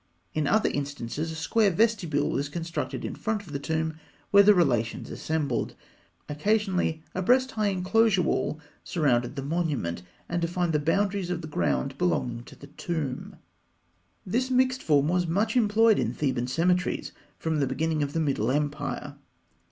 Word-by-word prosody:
In 155 Hz, -2 st, 0 dB
other 215 Hz, +7 st, +3 dB
instances 145 Hz, +2 st, -3 dB
a -, -, -6 dB
square 200 Hz, +7 st, +2 dB
vestibule 180 Hz, -7 st, +1 dB
was 140 Hz, +1 st, -1 dB
constructed 165 Hz, +2 st, -4 dB
in -, -, -4 dB
front 220 Hz, -2 st, -2 dB
of 155 Hz, -, -11 dB
the 140 Hz, -, -2 dB
tomb 160 Hz, +1 st, -2 dB, 0.3 s
where 200 Hz, -, +8 dB
the 205 Hz, +1 st, +6 dB
relations 120 Hz, -10 st, +1 dB
assembled 150 Hz, -6 st, -2 dB, 0.5 s
(fig. 150 Hz, -, -6 dB
146). 210 Hz, +7 st, +2 dB
Occasionally 160 Hz, -3 st, 0 dB
a 185 Hz, -, -2 dB
breast 255 Hz, +6 st, +3 dB
high 215 Hz, -2 st, 0 dB
enclosure 195 Hz, +1 st, +3 dB
wall 155 Hz, -, -1 dB, 0.2 s
surrounded 125 Hz, -8 st, +1 dB
the 135 Hz, -, -4 dB
monument, 145 Hz, -, -1 dB, 0.3 s
and 175 Hz, 0 st, -2 dB
defined 175 Hz, 0 st, 0 dB
the 150 Hz, -, +3 dB
boundaries 195 Hz, +4 st, 0 dB
of 175 Hz, -2 st, -2 dB
the -, -, -5 dB
ground 75 Hz, -, -1 dB
belonging 115 Hz, +7 st, 0 dB
to -, -, -13 dB
the -, -, -12 dB
tomb. 145 Hz, -3 st, -4 dB, 0.9 s
This 250 Hz, +7 st, 0 dB
mixed 255 Hz, 0 st, +2 dB
form 145 Hz, -2 st, +3 dB
was 175 Hz, +1 st, +1 dB
much 210 Hz, +7 st, 0 dB
employed 225 Hz, -1 st, +4 dB
in -, -, -1 dB
Theban 130 Hz, -4 st, -1 dB
cemeteries 180 Hz, +7 st, 0 dB, 0.3 s
from 160 Hz, -1 st, -1 dB
the 140 Hz, -, +1 dB
beginning 155 Hz, +4 st, -1 dB
of 145 Hz, 0 st, -2 dB
the 165 Hz, -, 0 dB
Middle 135 Hz, -7 st, 0 dB
Empire. 145 Hz, +2 st, -2 dB
160 Hz, 165 wpm, -27 LUFS, 145-195 Hz, 0.9 s, where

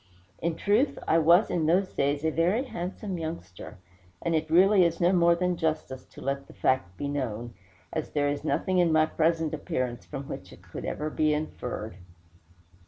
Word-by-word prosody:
In 170 Hz, -1 st, -1 dB
truth, 215 Hz, -, +2 dB
I 165 Hz, -, +4 dB
was 170 Hz, +6 st, +5 dB
in 160 Hz, -3 st, +1 dB
those 185 Hz, +3 st, +2 dB
days 145 Hz, +2 st, 0 dB
a 160 Hz, -, +2 dB
very 180 Hz, -, +2 dB
handsome 185 Hz, -4 st, -5 dB
youngster, 105 Hz, -, -7 dB, 0.5 s
and 170 Hz, -, 0 dB
it 160 Hz, 0 st, 0 dB
really 190 Hz, +4 st, +6 dB
is 170 Hz, -1 st, +1 dB
no 175 Hz, +1 st, +4 dB
more 170 Hz, -1 st, +5 dB
than 180 Hz, +1 st, 0 dB
justice 155 Hz, -5 st, -2 dB
to -, -, -14 dB
let 140 Hz, 0 st, -3 dB
the -, -, -14 dB
fact 90 Hz, -9 st, 0 dB
be 145 Hz, -, -3 dB
known, 120 Hz, -5 st, -3 dB, 0.4 s
as 160 Hz, -, -3 dB
there 145 Hz, -1 st, 0 dB
is 145 Hz, +1 st, -2 dB
nothing 185 Hz, +3 st, +1 dB
in 175 Hz, -2 st, +4 dB
my 155 Hz, 0 st, +5 dB
present 160 Hz, 0 st, 0 dB
appearance 125 Hz, -5 st, -3 dB
from 135 Hz, -2 st, -7 dB
which -, -, -7 dB
it -, -, -15 dB
could -, -, -8 dB
ever 155 Hz, +1 st, -3 dB
be 155 Hz, -1 st, +2 dB
inferred. 125 Hz, -, -5 dB
160 Hz, 185 wpm, -27 LUFS, 140-175 Hz, 0.5 s, really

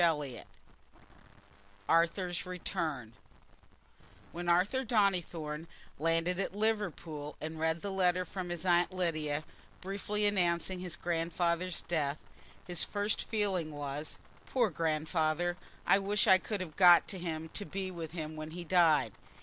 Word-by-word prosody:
Chapter 160 Hz, -3 st, +3 dB
XLIV 125 Hz, -4 st, -8 dB, 1.4 s
Arthur's 170 Hz, +2 st, +2 dB
Return 155 Hz, -9 st, -3 dB, 1.2 s
When 175 Hz, +1 st, -3 dB
Arthur 195 Hz, +10 st, +3 dB
Donnithorne 175 Hz, -8 st, 0 dB, 0.3 s
landed 165 Hz, +3 st, +1 dB
at 195 Hz, -, -2 dB
Liverpool 175 Hz, -9 st, -2 dB
and 160 Hz, +1 st, -5 dB
read 160 Hz, +1 st, +1 dB
the 200 Hz, -, -2 dB
letter 180 Hz, -1 st, +2 dB
from 180 Hz, +1 st, -5 dB
his 175 Hz, 0 st, -4 dB
Aunt 175 Hz, 0 st, +4 dB
Lydia, 155 Hz, -5 st, -1 dB, 0.4 s
briefly 205 Hz, +2 st, -2 dB
announcing 180 Hz, -2 st, +1 dB
his 180 Hz, -1 st, -4 dB
grand 170 Hz, -1 st, -2 dB
father's 175 Hz, +1 st, 0 dB
death, 150 Hz, -4 st, 0 dB, 0.5 s
his 175 Hz, -2 st, 0 dB
first 205 Hz, +1 st, -1 dB
feeling 190 Hz, -8 st, 0 dB
was, 145 Hz, +1 st, -5 dB, 0.3 s
"Poor 240 Hz, -6 st, +2 dB
Grandfather! 160 Hz, +1 st, 0 dB, 0.3 s
I 195 Hz, -, +5 dB
wish 200 Hz, +1 st, +1 dB
I 190 Hz, -, +7 dB
could 205 Hz, 0 st, -3 dB
have 160 Hz, -4 st, -6 dB
got 175 Hz, -2 st, +8 dB
to 190 Hz, -, -4 dB
him 160 Hz, -2 st, -4 dB
to 205 Hz, -, -4 dB
be 195 Hz, -1 st, -4 dB
with 165 Hz, -3 st, -6 dB
him 155 Hz, -2 st, -5 dB
when 155 Hz, 0 st, -6 dB
he 175 Hz, +2 st, -6 dB
died. 170 Hz, -3 st, +4 dB
175 Hz, 140 wpm, -32 LUFS, 160-185 Hz, 1.4 s, got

